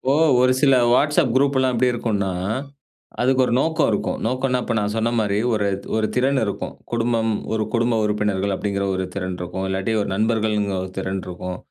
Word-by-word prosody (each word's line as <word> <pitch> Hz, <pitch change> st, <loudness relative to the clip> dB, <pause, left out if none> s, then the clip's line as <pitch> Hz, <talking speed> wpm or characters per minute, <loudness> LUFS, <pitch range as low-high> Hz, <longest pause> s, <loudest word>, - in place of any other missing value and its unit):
இப்போ 135 Hz, +1 st, +1 dB, 0.3 s
ஒரு 130 Hz, -, +4 dB
சில 135 Hz, -2 st, +5 dB, 0.2 s
WhatsApp 150 Hz, +2 st, +3 dB
குரூப்லாம் 130 Hz, -2 st, +2 dB
எப்டி 125 Hz, +2 st, +3 dB
இருக்குன்னா, 105 Hz, -5 st, -1 dB, 0.9 s
அதுக்கு 130 Hz, +1 st, +3 dB
ஒரு 120 Hz, -, -1 dB
நோக்கம் 160 Hz, 0 st, +1 dB
இருக்கும். 105 Hz, -, -1 dB
நோக்கனா, 130 Hz, +1 st, 0 dB
இப்ப 120 Hz, -, -2 dB
நான் 105 Hz, 0 st, -1 dB
சொன்ன 115 Hz, +1 st, 0 dB
மாரி 105 Hz, -1 st, 0 dB
ஒரு 100 Hz, -2 st, +1 dB, 0.3 s
ஒரு 110 Hz, -1 st, +1 dB
திறன் 130 Hz, +2 st, +2 dB
இருக்கும் 100 Hz, -, -4 dB, 0.2 s
குடும்பம் 115 Hz, -1 st, +1 dB, 0.2 s
ஒரு 110 Hz, -, 0 dB
குடும்ப 120 Hz, -1 st, +2 dB
உறுப்பினர்கள் 105 Hz, -2 st, 0 dB
அப்டிங்கிற 100 Hz, -1 st, -2 dB
ஒரு 95 Hz, 0 st, -2 dB
திறன் 95 Hz, -2 st, -3 dB
இருக்கும் 90 Hz, +2 st, -4 dB
இல்லாட்டி 95 Hz, +4 st, -1 dB
ஒரு 100 Hz, -, -3 dB
நண்பர்கள்ங்கிற 105 Hz, -2 st, 0 dB
ஒரு 95 Hz, -, -7 dB
திறன் 95 Hz, 0 st, -2 dB
இருக்கும் 90 Hz, 0 st, -6 dB
110 Hz, 175 wpm, -22 LUFS, 100-125 Hz, 0.9 s, சில